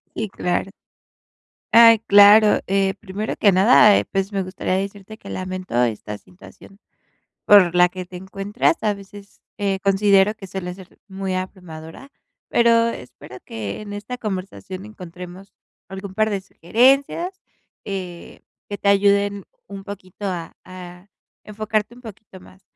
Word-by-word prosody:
Y, 220 - -3
claro. 185 +1 -2 1.0
Ay, 230 -1 +8
claro. 210 0 +6
Eh, 195 0 +1
primero 205 +1 -5
que 200 -3 +4
nada, 205 +2 +6
eh, - - +1
pues, 195 +1 -3
me 195 -1 -1
gustaría 185 0 -3
decirte 200 +2 -5
que 195 - -11
lamento 185 -9 -3
esta 105 -2 -4
situación 195 +2 -17 0.7
por 185 -4 +6
la 180 0 +5
que 185 0 -7
te 180 0 -10
encuentras. 195 - -1
A 210 -1 +2
veces, 200 0 -14 0.2
eh, 195 -2 -1
considero 195 +1 +3
que 195 - -11
suele 180 -1 -6
ser 190 0 -16
muy 190 -1 -4
abrumadora. 185 - -8 0.4
Pero 230 -1 +3
espero 125 - -10
que 110 - -6
en 205 -1 -8
esta 210 +5 -6
conversación 190 -1 -6
encontremos 180 -1 -11 0.4
algún 190 0 -8
par 215 +2 +1
de 200 -2 -2
sugerencias, 275 - +1 0.4
eh, 185 -4 -7 0.3
que 205 - -4
te 200 - 0
ayuden 200 0 +2 0.2
un 195 0 -9
poquito 200 0 -9
a 170 -3 -5
a 180 0 -11 0.4
enfocarte 215 +2 -3
un 250 - -16
poquito 210 -4 -12
más. 185 +1 -18
195 Hz, 140 wpm, -21 LUFS, 185-210 Hz, 1.0 s, Ay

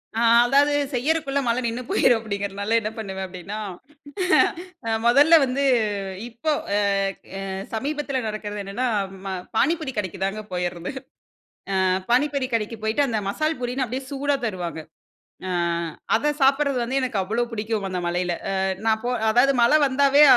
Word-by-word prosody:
ஆ - - 0 0.3
அதாவது 285 +3 +4 0.2
செய்யிறக்குள்ள 280 +2 0
மழ 235 - +2
நின்னுபோயிரும், 235 0 +2
அப்பிடிங்கிறனால 200 0 -2
என்ன 215 - -2
பண்ணுவேன், 190 -3 -4
அப்பிடின்னா, 185 +3 -7 1.3
ஆ - - 0 0.2
மொதல்ல 290 +7 +7
வந்து 265 +2 -1 0.7
இப்போ 240 +7 -2 0.3
அ - - +3 0.6
அ - - -4 0.3
சமீபத்தில 280 +2 -2
நடக்கிறது 210 -1 -4
என்னன்னா, 220 +6 -2 0.4
ம - - -4 0.3
பாணிபூரி 315 -1 +1
கடைக்குதாங்க 195 +2 -2
போயிறது. 175 -1 -3 0.9
ஆ - - +2 0.3
பானிபூரி 275 +1 +2
கடைக்கு 225 0 -2
போயிட்டு 230 +6 +2
அந்த 220 -2 0
மசால் 310 +6 -1
பூரின்னு 250 +2 -1
அப்பிடியே 260 +3 -5
சூடாக 280 0 -1
தருவாங்க. 175 -6 -4 0.7
ஆ - - -3 0.7
அத 290 - +1
சாப்பிட்றது 275 0 +3
வந்து 260 +3 0
எனக்கு 245 -6 -1
அவ்ளோ 225 +5 0
பிடிக்கும். 215 -2 -2
அந்த 185 -1 -2
மழையில. 175 0 0 0.2
அ - - -1 0.3
நான் 220 0 +2
போ - - 0 0.2
அதாவது 260 +4 +4
மழை 265 +6 +6
வந்தாவே 280 +2 +5
235 Hz, 140 wpm, -23 LUFS, 205-275 Hz, 1.3 s, மொதல்ல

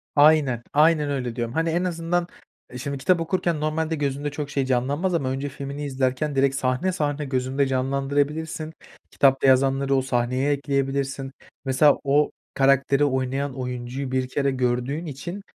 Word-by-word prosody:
Aynen, 145 -5 +4
aynen 150 0 +4
öyle 125 -4 -3
diyorum. 115 -1 -3
Hani, 165 +2 0
en 170 +2 0
azından, 175 0 -1 0.5
şimdi, 140 +2 -4
kitap 175 +6 +2
okurken 165 -1 -1
normalde 155 +1 -1
gözünde 145 0 -2
çok 145 0 -5
şey 140 -2 -1
canlanmaz 140 +8 0
ama 140 -6 0
önce 135 +2 -3
filmini 140 +2 -6
izlerken 135 +2 -1
direkt 135 0 +2
sahne, 130 +7 0
sahne 150 -4 -2
gözünde 130 +1 0
canlandırabilirsin. 140 +4 -1 0.4
Kitapta 135 -1 +3
yazanları 135 +1 +3
o 135 - +3
sahneye 130 +2 0
ekleyebilirsin. 140 -1 -1 0.3
Mesela, 135 +2 +4
o 145 +1 +2 0.2
karakteri 140 +1 +3
oynayan 135 0 -1
oyuncuyu 125 +1 -4
1 130 -1 0
kere 140 +1 0
gördüğün 130 +5 -1
için 170 +7 -6
140 Hz, 145 wpm, -24 LUFS, 130-150 Hz, 0.5 s, Aynen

